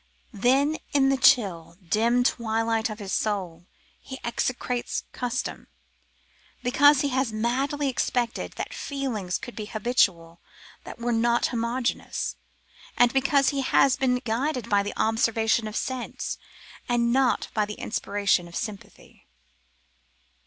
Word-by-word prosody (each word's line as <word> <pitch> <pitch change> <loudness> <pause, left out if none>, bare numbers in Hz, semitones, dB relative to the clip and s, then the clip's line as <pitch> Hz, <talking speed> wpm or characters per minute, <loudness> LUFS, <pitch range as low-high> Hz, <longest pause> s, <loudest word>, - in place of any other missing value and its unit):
Then, 270 +8 +2 0.2
in 270 -1 +4
the 270 - +3
chill, 200 -11 +3
dim 235 +6 +2
twilight 225 -1 0
of 215 - -6
his 200 -3 -5
soul, 180 -5 -2 0.3
he 265 - -9
execrates 245 +1 -2
custom; 250 +1 -4 1.0
because 285 +3 +5
he 285 - 0
has 260 -2 0
madly 265 +6 -1
expected 245 -2 -1
that - - -5
feelings 235 -11 -3
could 245 - -9
be 215 - -5
habitual 195 -7 0 0.4
that - - -8
were 240 0 -2
not 235 +1 +2
homogeneous, 235 +1 -2 0.6
and 245 -1 +4
because 275 0 +3
he 280 -1 -1
has 265 0 +4
been 255 -2 +1
guided 250 +1 -2
by 200 0 +4
the 205 - -5
observation 225 0 +2
of 215 - -7
sense, 260 -2 -4 0.5
and 235 0 +2
not 260 -2 +2
by 215 - +2
the 210 0 -7
inspiration 200 -4 0
of 170 - -12
sympathy. 210 -2 -8
235 Hz, 130 wpm, -26 LUFS, 215-260 Hz, 1.0 s, because